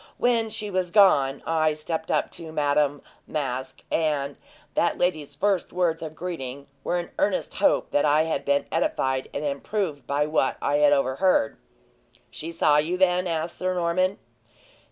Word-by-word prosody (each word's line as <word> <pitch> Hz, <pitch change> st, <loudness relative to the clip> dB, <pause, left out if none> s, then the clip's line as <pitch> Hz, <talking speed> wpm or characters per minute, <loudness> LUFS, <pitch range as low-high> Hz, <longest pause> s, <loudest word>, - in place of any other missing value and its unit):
When 230 Hz, -2 st, +2 dB
she 215 Hz, -1 st, -4 dB
was 185 Hz, -1 st, 0 dB
gone, 145 Hz, -9 st, +4 dB
I 155 Hz, -1 st, +2 dB
stepped 160 Hz, +1 st, -4 dB
up -, -, 0 dB
to 160 Hz, -1 st, -7 dB
Madame 145 Hz, -1 st, +1 dB, 0.2 s
Masque, 130 Hz, -3 st, -4 dB
and 145 Hz, -3 st, 0 dB, 0.4 s
that 170 Hz, -, +1 dB
lady's 155 Hz, -5 st, -1 dB
first 195 Hz, +3 st, 0 dB
words 175 Hz, -2 st, 0 dB
of 155 Hz, -1 st, -6 dB
greeting 140 Hz, -6 st, -5 dB, 0.2 s
were 175 Hz, -, 0 dB
an 175 Hz, -, -4 dB
earnest 195 Hz, -2 st, 0 dB
hope 200 Hz, -, +2 dB
that 145 Hz, -, +2 dB
I 150 Hz, +1 st, +4 dB
had 160 Hz, -3 st, -2 dB
been 140 Hz, 0 st, +1 dB
edified 130 Hz, -, 0 dB
and 145 Hz, -, -4 dB
improved 145 Hz, +1 st, -3 dB
by 145 Hz, +1 st, +1 dB
what 150 Hz, -3 st, +1 dB
I 145 Hz, -, +1 dB
had 145 Hz, -1 st, +5 dB
overheard." 140 Hz, 0 st, +2 dB, 0.8 s
"She 160 Hz, +8 st, -6 dB
saw 150 Hz, -3 st, +3 dB
you, 160 Hz, +5 st, +1 dB
then?" 180 Hz, -1 st, +3 dB
said 165 Hz, -2 st, -1 dB
Sir 185 Hz, +1 st, -2 dB
Norman. 185 Hz, +3 st, +1 dB
155 Hz, 160 wpm, -25 LUFS, 145-180 Hz, 0.8 s, had